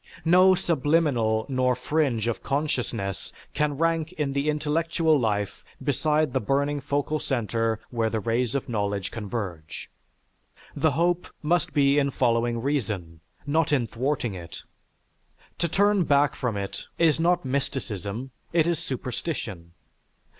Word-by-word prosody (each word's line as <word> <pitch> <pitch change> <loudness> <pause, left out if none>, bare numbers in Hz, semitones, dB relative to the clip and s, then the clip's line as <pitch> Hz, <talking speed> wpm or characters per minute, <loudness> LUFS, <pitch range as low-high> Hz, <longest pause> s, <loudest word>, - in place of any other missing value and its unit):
No 185 +3 +6
subliminal 145 -10 +1
nor 130 -2 +1
fringe 125 -3 0
of 120 - -2
consciousness 125 -9 -2 0.2
can 150 -2 0
rank 165 0 +1
in 150 -5 -2
the 140 +2 0
intellectual 155 +1 +1
life 105 -4 -1 0.2
beside 150 0 +1
the - - +2
burning 140 +5 0
focal 145 +2 -1
center 115 -4 -1
where 115 -2 +1
the 110 - -1
rays 115 +3 0
of 140 - -1
knowledge 100 -3 -2
converge. 100 -8 -5 0.8
The 160 -3 +2
hope 170 +4 +1 0.2
must 170 +1 +1
be 140 0 +4
in 140 -1 +2
following 120 -2 +1
reason, 105 - -2 0.3
not 150 +1 +1
in 135 -5 +3
thwarting 125 0 -2
it. 85 -2 -9 1.0
To 170 - +1
turn 200 +1 +3
back 145 -1 +3
from 120 -5 -2
it 100 -1 -5
is 160 -2 +3
not 175 -1 +2
mysticism, 130 -3 -3 0.2
it 165 -2 +4
is 170 -2 +1
superstition. 125 - -5
135 Hz, 130 wpm, -26 LUFS, 115-155 Hz, 1.0 s, No